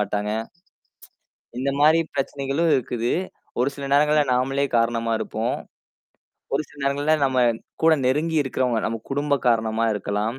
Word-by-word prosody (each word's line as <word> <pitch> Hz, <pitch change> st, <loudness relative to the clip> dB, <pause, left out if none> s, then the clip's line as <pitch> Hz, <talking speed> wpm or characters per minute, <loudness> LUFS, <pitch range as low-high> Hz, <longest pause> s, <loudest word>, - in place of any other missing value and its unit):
மாட்டாங்க. 105 Hz, +1 st, -1 dB, 1.3 s
இந்தமாரி 145 Hz, +4 st, +3 dB
பிரச்சனைகளும் 140 Hz, +3 st, -1 dB
இருக்குது. 120 Hz, -2 st, -1 dB, 0.5 s
ஒரு 125 Hz, +3 st, +3 dB
சில 140 Hz, -, -7 dB
நேரங்கள்ல 150 Hz, +1 st, +4 dB
நாமளே 135 Hz, +2 st, +1 dB
காரணமா 115 Hz, 0 st, +1 dB
இருப்போம். 110 Hz, +2 st, -2 dB, 1.0 s
ஒரு 150 Hz, -, +1 dB
சில 145 Hz, -, -18 dB
நேரங்கள்ல 145 Hz, +3 st, +1 dB
நம்ம 130 Hz, -1 st, +1 dB, 0.4 s
கூட 165 Hz, 0 st, +6 dB
நெருங்கி 155 Hz, +5 st, +1 dB
இருக்கிறவங்க, 125 Hz, -3 st, 0 dB
நம்ம 115 Hz, 0 st, -2 dB
குடும்ப 145 Hz, +1 st, +1 dB
காரணமா 110 Hz, 0 st, +1 dB
இருக்கலாம். 105 Hz, +5 st, -2 dB
135 Hz, 120 wpm, -23 LUFS, 115-145 Hz, 1.3 s, கூட